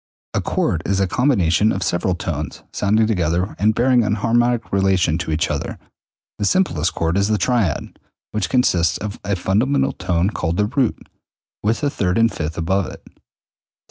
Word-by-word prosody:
A - - 0
chord 80 - 0
is 95 +1 +1
a 95 - +3
combination 105 - +2
of 95 - -2
several 85 +1 0
tones - - -5
sounding 110 +2 +2
together 90 -2 0
and 110 +2 +3
bearing 125 0 +3
an 105 0 +1
harmonic 120 +2 +1
relation 95 -4 +2
to 90 - -4
each 80 -1 0
other. - - -3 0.6
The 105 - 0
simplest 95 - +1
chord 85 +2 0
is 100 0 +2
the 110 0 +1
triad, 110 -10 -1 0.3
which 105 -3 -2
consists 85 -10 +2
of 105 -1 -6
a 100 0 -1
fundamental 130 +10 +1
tone 90 +3 0
called 85 -5 -2
the 105 - +2
root, 125 +1 -1 0.5
with 110 +2 0
the 145 - 0
third 90 -7 0
and 115 0 +3
fifth 80 +1 -4
above 90 +3 0
it. - - -11
100 Hz, 175 wpm, -20 LUFS, 85-115 Hz, 0.6 s, a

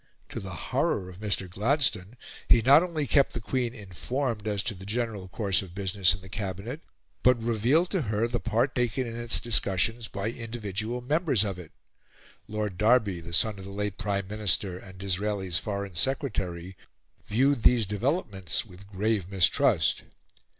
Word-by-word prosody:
To - - -5
the - - -7
horror 90 -1 -1
of 90 0 -12
Mr. 100 -3 -1
Gladstone, 115 - 0 0.3
he 115 - +6
not 140 +6 +8
only 165 -4 -2
kept 140 +2 +3
the 120 - -3
Queen 120 +2 -2
informed 110 +3 -3
as 100 -2 0
to 120 - -2
the 95 -1 -11
general 110 -3 -2
course 95 -1 0
of 90 -2 -11
business 95 -2 +2
in 95 - -11
the 95 - -12
Cabinet, 100 - -5 0.4
but 125 -1 +4
revealed 120 - +2
to 190 - +1
her 110 -2 0
the 120 0 -2
part 120 +5 +1
taken 125 +1 0
in 115 -1 -6
its 120 -1 0
discussions 115 +1 +1
by 100 +3 -3
individual 115 0 -4
members 145 - +2
of 100 -3 -3
it. 85 -3 -11 0.8
Lord 105 -3 -3
Derby, 105 -5 +3
the 85 +1 -9
son 100 +4 +2
of 95 - -8
the - - -8
late 105 0 -3
Prime 100 -3 -1
Minister 100 -3 +1
and 95 0 -13
Disraeli's 95 -2 -1
Foreign 100 -2 -4
Secretary, 95 - -2 0.5
viewed 130 +4 +2
these 115 -1 +5
developments 105 - -1
with 95 -1 -14
grave 100 -1 -1
mistrust. 95 -4 +3
105 Hz, 165 wpm, -28 LUFS, 95-120 Hz, 0.8 s, not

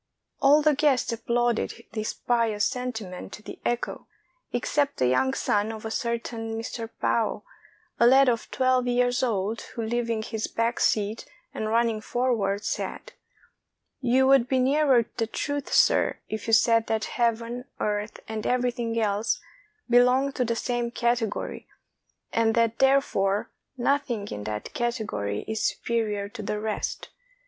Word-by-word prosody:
All 290 +2 +6
the 305 0 +5
guests 275 -4 +2
applauded 235 0 -1
this 215 -1 -2
pious 225 -4 +1
sentiment 225 -7 -4
to 210 - -10
the - - -9
echo, 240 0 -2 0.4
except 280 +4 0
the 130 - +2
young 195 - +2
son 210 +2 0
of 220 0 -8
a 220 - -3
certain 230 -1 -3
Mr. 225 0 -5
Pao, 225 -2 0 0.6
a 235 - +6
lad 265 +2 +6
of 235 -2 0
twelve 255 -1 +2
years 245 0 +2
old, 220 -3 -1
who, 230 - -6
leaving 230 -1 -1
his 220 0 -3
back 230 +1 -1
seat 210 +1 0 0.3
and 215 - -3
running 230 -1 +1
forward, 215 -5 0
said: - - -4 0.4
— - - -55
"You 260 +1 +3
would 265 -2 +5
be 260 - +1
nearer 265 -2 +4
the 225 -2 0
truth, 285 +4 -3
sir, - - +4
if 215 0 -5
you 225 - 0
said 230 0 +4
that 220 -1 0
Heaven, 235 +1 -1
Earth, 210 +1 -2
and 220 -1 -4
everything 240 -2 0
else 210 0 0 0.5
belonged 250 +3 +4
to 250 - +2
the 235 0 0
same 240 0 -1
category, 235 -2 -1 0.7
and 225 -1 +2
that, 230 -1 +2
therefore, 265 -8 +2 0.3
nothing 240 -5 0
in 105 0 -6
that 105 0 -5
cate 240 -1 -1
gory 100 - -3
is 220 0 -2
superior 215 -3 -1
to 220 +2 -8
the 210 0 -3
rest. 215 0 -3
230 Hz, 150 wpm, -26 LUFS, 220-250 Hz, 0.7 s, All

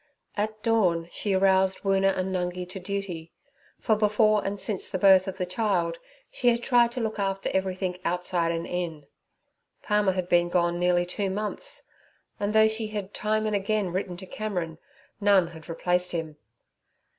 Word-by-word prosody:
At 215 +1 -3
dawn 185 -8 +2
she 200 -2 0
aroused 190 0 +3
Woona 195 0 +2
and 185 0 -2
Nungi 180 0 -2
to 190 - -6
duty, 185 -4 -5 0.5
for 220 - +2
before 215 0 +3
and 200 +1 -3
since 205 -3 -1
the 190 - -2
birth 190 0 +6
of 190 - -5
the 180 - -1
child 180 -4 0 0.3
she 245 - -2
had 235 0 +1
tried 240 -2 +4
to 255 - -3
look 220 -2 -2
after 195 -1 -1
everything 185 -1 -1
outside 175 -1 0
and 165 0 -3
in. 170 -5 -4 0.8
Palmer 210 -2 +2
had 185 -1 -2
been 175 -1 +3
gone 175 -1 +1
nearly 175 0 +2
two 195 +2 -2
months, 210 - -3 0.6
and 205 0 0
though 220 0 +6
she 220 0 -2
had 205 -2 -5
time 215 0 0
and 215 -1 0
again 200 -1 0
written 180 -1 -3
to 190 - -9
Cameron, 180 -6 -4 0.4
none 200 -3 +4
had 160 -2 -13
replaced 180 +2 0
him. 160 -3 -4
190 Hz, 170 wpm, -26 LUFS, 180-210 Hz, 0.8 s, birth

